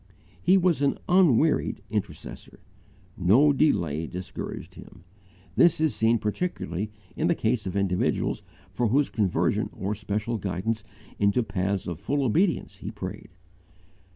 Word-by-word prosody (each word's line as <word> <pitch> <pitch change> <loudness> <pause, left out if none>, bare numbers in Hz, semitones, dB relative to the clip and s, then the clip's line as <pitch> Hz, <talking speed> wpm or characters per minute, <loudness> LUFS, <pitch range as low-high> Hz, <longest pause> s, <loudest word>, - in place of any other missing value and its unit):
He 185 +3 +5
was 175 -5 +2
an 140 - +2
unwearied 165 -5 +3
intercessor. - - -5 0.6
No 120 - +5
delay 85 - +1
discouraged 90 +2 -6
him. 90 - -14 0.5
This 170 -3 +5
is 155 -3 +2
seen 115 +1 +3
particularly 105 - -3 0.3
in 160 - 0
the 170 - +3
case 110 -4 0
of 95 - -4
individuals 95 -2 0 0.3
for 120 - 0
whose 140 +6 +2
conversion 100 -5 +1
or 100 +2 -3
special 105 +2 -3
guidance 100 +4 -2 0.4
into 100 +4 +3
the 115 - -6
paths 95 0 -1
of 85 -3 -5
full 140 0 0
obedience 145 - +1
he 105 - -6
prayed. 105 -1 -7
110 Hz, 135 wpm, -26 LUFS, 95-145 Hz, 0.6 s, He